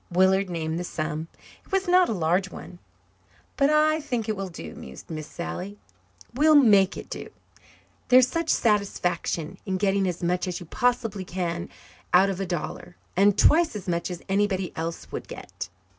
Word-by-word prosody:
Willard 190 +2 +3
named 165 -1 -2
the - - -3
sum. 155 -1 -4 0.4
It - - -24
was 385 0 +1
not 360 0 +5
a - - 0
large 180 +1 +1
one. 175 0 -10 0.8
"But 275 +1 +3
I 310 +1 +3
think 245 -7 -3
it 215 - 0
will 195 -1 -4
do," 85 - -8
mused 65 - -11
Miss 155 -1 -5
Sally. 185 +3 -6 0.6
"We'll 305 +4 +5
make 210 -8 +5
it - - -8
do. - - -7 0.8
There's 255 0 +7
such 330 +5 -2
satisfaction 185 -5 0 0.2
getting 195 0 +1
as 180 -1 -4
much 180 +2 0
as 180 -1 -3
you 175 - -9
possibly 235 -1 0
can 175 -1 -3 0.5
out 195 +2 +5
of 190 - -5
a 195 - -2
dollar, 175 0 -5 0.2
and 200 +2 +4
twice 325 -4 +4
as 205 - -6
much 170 0 -1
as 175 -2 -7
anybody 195 -2 0
else 165 +1 -5
would - - -6
get. - - -8
190 Hz, 175 wpm, -25 LUFS, 175-225 Hz, 0.8 s, There's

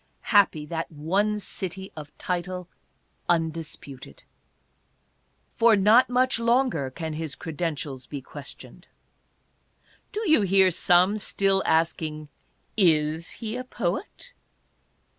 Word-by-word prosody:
Happy 195 -7 +4
that 165 +1 -4
one 195 +8 0
city 190 -1 -5
of 150 -2 -9
title 180 0 -3 0.6
undis 165 -2 -1
puted! 130 - -12 1.3
For 230 -1 +4
not 215 +6 +5
much 250 -1 +2
longer 235 - +1
can 160 +3 -5
his 155 -3 -4
credentials 150 -5 -4
be 145 - -5
questioned. 130 - -12 1.2
Do 430 0 -3
you 315 -8 +5
hear 190 -1 +4
some 180 +4 +3
still 195 -1 +2
asking: 155 -2 0 0.5
"Is 160 -4 +2 0.2
he 220 +1 -3
a 255 - -4
poet?" 250 - -4
175 Hz, 105 wpm, -25 LUFS, 155-210 Hz, 1.3 s, not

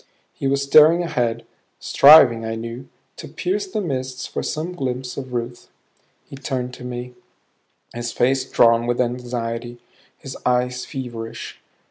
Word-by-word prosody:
He 135 - -3
was 140 +1 +1
staring 155 +5 +6
ahead, 120 -8 -2 0.3
striving, 140 -6 +7
I 110 0 -3
knew, 115 +3 -7 0.3
to - - -8
pierce 395 +2 -3
the 295 - -3
mists 130 -6 -4
for - - -4
some 165 +4 -4
glimpse 130 -5 -4
of 130 -2 -7
Ruth. 120 0 -5 0.6
He - - -11
turned 130 -2 -4
to 125 - -10
me, 125 0 -6 0.8
his 120 0 -4
face 130 +2 +1
drawn 115 0 +4
with 120 0 -1
anxiety, 120 -1 -3 0.4
his 135 - -9
eyes 125 0 0
feverish. 115 -3 -7
125 Hz, 140 wpm, -21 LUFS, 120-135 Hz, 0.8 s, striving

